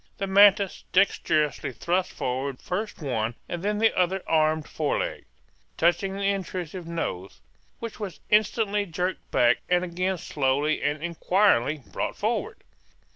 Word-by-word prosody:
The 195 - -2
mantis 200 0 +5
dexterously 155 -7 +2
thrust 180 +8 -1
forward 130 0 -3
first 195 -1 -4
one 115 -4 -1
and 175 - -4
then 210 +2 0
the 225 +1 +3
other 185 +1 +1
armed 155 -1 +2
fore 150 -2 -1
leg, - - -3 0.5
touching 175 +3 +2
the 200 - -4
intrusive 185 -3 -3
nose, 100 - -4 0.4
which 230 -2 -7
was 195 -6 -6
instantly 210 -1 +2
jerked 180 +2 -3
back 120 0 +3
and 180 0 +3
again 180 +2 -1
slowly 145 -1 0
and 145 +1 -1
inquiringly 170 - +2
brought - - -4
forward. - - -2
175 Hz, 135 wpm, -26 LUFS, 150-195 Hz, 0.5 s, mantis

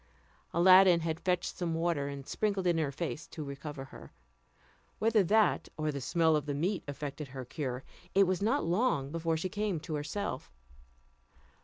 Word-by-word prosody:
Aladdin 185 0 +7
had 160 0 -2
fetched 180 -1 -1
some 170 -2 -2
water, 165 -4 0
and 140 -1 -6
sprinkled 200 0 -1
it 175 - +4
in 165 - 0
her 150 -3 0
face 160 +2 -4
to 155 - -7
recover 140 0 -7
her. - - -13 0.9
Whether 220 -1 +3
that 215 +4 +3
or 155 -1 0
the 140 -1 -5
smell 160 +3 +3
of 150 -1 -1
the 145 - -1
meat 180 +7 -1
effected 145 +1 -5
her 130 -1 -7
cure, 130 -1 -4 0.3
it 195 0 +6
was 185 +1 0
not 230 +8 +2
long 170 - +1
before 165 0 -1
she 165 - -2
came 205 -2 -2
to 160 - -6
herself. 150 +1 -4
165 Hz, 175 wpm, -31 LUFS, 145-185 Hz, 0.9 s, Aladdin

